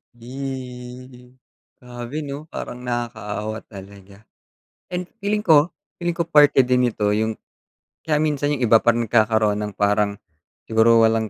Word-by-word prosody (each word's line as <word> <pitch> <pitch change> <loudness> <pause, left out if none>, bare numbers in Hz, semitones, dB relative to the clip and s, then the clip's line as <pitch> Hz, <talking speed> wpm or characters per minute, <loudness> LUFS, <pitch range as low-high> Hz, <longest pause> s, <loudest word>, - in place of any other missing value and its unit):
Ih. 125 0 -8 0.4
Grabe 125 +4 -7
'no? 145 +2 -7
Parang 125 -5 -7
nakakaawa 110 -3 -4
talaga. 100 0 -13 0.7
And 180 0 -3
feeling 210 +1 -1
ko 160 -3 +4 0.3
feeling 175 -1 -2
ko 170 -1 -2
parte 150 -3 +5
din 125 0 +2
ito 105 -1 -1
yung 110 +1 0 0.7
kaya 150 -2 +1
minsan 150 -1 0
yung 130 - -3
iba 115 0 +5
parang 120 0 +2
nagkakaroon 110 -2 +2
ng 105 -1 -4
parang 105 0 +1 0.5
siguro 115 +1 +4
walang 110 -1 +1
120 Hz, 135 wpm, -22 LUFS, 110-140 Hz, 0.7 s, parte